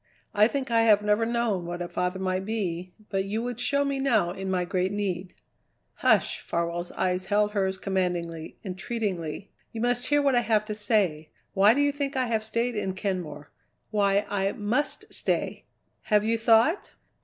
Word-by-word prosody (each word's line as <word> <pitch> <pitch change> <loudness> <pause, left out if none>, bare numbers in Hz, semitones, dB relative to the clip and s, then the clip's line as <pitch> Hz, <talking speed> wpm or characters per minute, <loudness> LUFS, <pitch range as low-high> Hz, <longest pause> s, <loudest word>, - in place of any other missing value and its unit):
I 210 0 +5
think 265 0 -3
I 230 0 +4
have 210 -2 +5
never 210 +2 +2
known 230 -7 0
what 175 0 -4
a 175 - -3
father 180 +1 -2
might 185 0 -1
be, 185 -4 -3 0.2
but 195 -1 +1
you 215 +3 -2
would 245 -1 -4
show 280 +3 +1
me 280 -1 -1
now 220 -10 +2
in 190 +1 -5
my 180 -1 0
great 185 +1 0
need." 190 -3 -3 0.6
"Hush!" - - +3
Farwell's 170 +1 -3
eyes 185 0 0
held 210 +1 +2
hers 190 -2 0
commandingly, 175 -4 -2
entreatingly. 190 -3 -4 0.2
"You 225 - -5
must 245 +1 0
hear 290 0 +3
what 275 -1 +3
I 245 - +4
have 215 -2 +1
to 215 - -4
say. 205 -8 0 0.2
Why 205 +4 +5
do 285 - +2
you 285 0 +3
think 280 -1 -3
I 255 - +2
have 225 -2 0
stayed 230 +2 -1
in 190 -3 -2
Kenmore? 175 -7 -4 0.4
Why 200 -1 +2
I 195 -1 0
must 225 +8 -1
stay? - - -2 0.4
Have 210 -2 +3
you 225 +1 +2
thought?" 230 - +3
205 Hz, 180 wpm, -27 LUFS, 185-230 Hz, 0.6 s, I